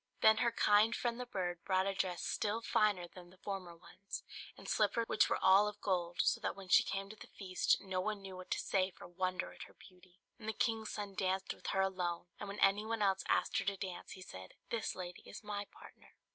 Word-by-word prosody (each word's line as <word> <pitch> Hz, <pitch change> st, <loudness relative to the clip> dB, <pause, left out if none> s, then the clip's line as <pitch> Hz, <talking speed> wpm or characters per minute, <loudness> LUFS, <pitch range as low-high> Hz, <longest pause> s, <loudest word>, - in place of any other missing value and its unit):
Then 220 Hz, 0 st, +7 dB
her 235 Hz, 0 st, +3 dB
kind 215 Hz, +1 st, +4 dB
friend 240 Hz, 0 st, -1 dB
the 250 Hz, -, -4 dB
bird 175 Hz, -5 st, -3 dB
brought 190 Hz, 0 st, +2 dB
a 195 Hz, -, 0 dB
dress 185 Hz, -2 st, -1 dB
still 220 Hz, +2 st, -1 dB
finer 205 Hz, -6 st, +2 dB
than 175 Hz, 0 st, -13 dB
the 185 Hz, -, -19 dB
former 185 Hz, -3 st, -5 dB
ones, 195 Hz, +3 st, -8 dB, 0.3 s
and -, -, -11 dB
slippers 230 Hz, -1 st, +2 dB
which 210 Hz, -, +3 dB
were -, -, +2 dB
all 195 Hz, +2 st, +6 dB
of 210 Hz, 0 st, -5 dB
gold; 175 Hz, -4 st, 0 dB
so -, -, +3 dB
that -, -, -1 dB
when 195 Hz, -1 st, -10 dB
she -, -, +8 dB
came 195 Hz, 0 st, -3 dB
to -, -, -10 dB
the -, -, -12 dB
feast 185 Hz, -2 st, +1 dB
no 190 Hz, -2 st, -2 dB
one 210 Hz, 0 st, -2 dB
knew 190 Hz, -1 st, -7 dB
what 185 Hz, 0 st, -9 dB
to -, -, 0 dB
say 190 Hz, -1 st, +1 dB
for 180 Hz, -, -13 dB
wonder 185 Hz, +1 st, -2 dB
at -, -, -9 dB
her -, -, -18 dB
beauty; 180 Hz, -1 st, -18 dB, 0.2 s
and 220 Hz, -1 st, -5 dB
the -, -, -1 dB
king's 220 Hz, 0 st, 0 dB
son 205 Hz, -1 st, -4 dB
danced 190 Hz, 0 st, 0 dB
with -, -, -10 dB
her 195 Hz, -, +2 dB
alone; 180 Hz, -3 st, -1 dB
and 205 Hz, -, -5 dB
when 200 Hz, -, -6 dB
any 195 Hz, +2 st, +5 dB
one 225 Hz, -1 st, -1 dB
else 195 Hz, -1 st, +2 dB
asked -, -, +2 dB
her -, -, -3 dB
to 200 Hz, 0 st, 0 dB
dance 185 Hz, -2 st, -6 dB
he 185 Hz, -, -9 dB
said, 95 Hz, -, -10 dB, 0.2 s
"This 230 Hz, -2 st, -1 dB
lady 180 Hz, -1 st, -6 dB
is -, -, -10 dB
my 205 Hz, -1 st, -3 dB
partner." -, -, -16 dB
195 Hz, 240 wpm, -36 LUFS, 185-210 Hz, 0.3 s, she